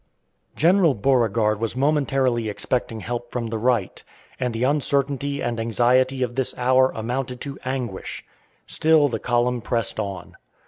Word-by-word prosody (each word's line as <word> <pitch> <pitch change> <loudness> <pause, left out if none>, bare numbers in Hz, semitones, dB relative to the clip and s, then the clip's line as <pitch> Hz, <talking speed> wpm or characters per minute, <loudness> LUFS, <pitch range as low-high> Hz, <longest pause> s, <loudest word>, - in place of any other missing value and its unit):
General 170 -3 +4
Beauregard 110 -2 +2
was 115 0 -1
momentarily 135 -4 +1
expecting 115 +1 -2
help 120 +2 -5
from 125 -2 -3
the 110 -1 -3
right, 120 -4 0 0.4
and 125 -1 -1
the 115 +1 -3
uncertainty 140 0 0
and 120 -1 -2
anxiety 125 +3 +2
of 120 -1 -3
this 130 0 -2
hour 130 +1 +3
amounted 125 +3 -3
to 140 -1 -5
anguish. 125 -7 -4 0.4
Still 155 -2 +3
the 115 -3 -3
column 120 +1 0
pressed 115 -1 -2
on. 100 -3 -5
125 Hz, 140 wpm, -23 LUFS, 115-135 Hz, 0.4 s, General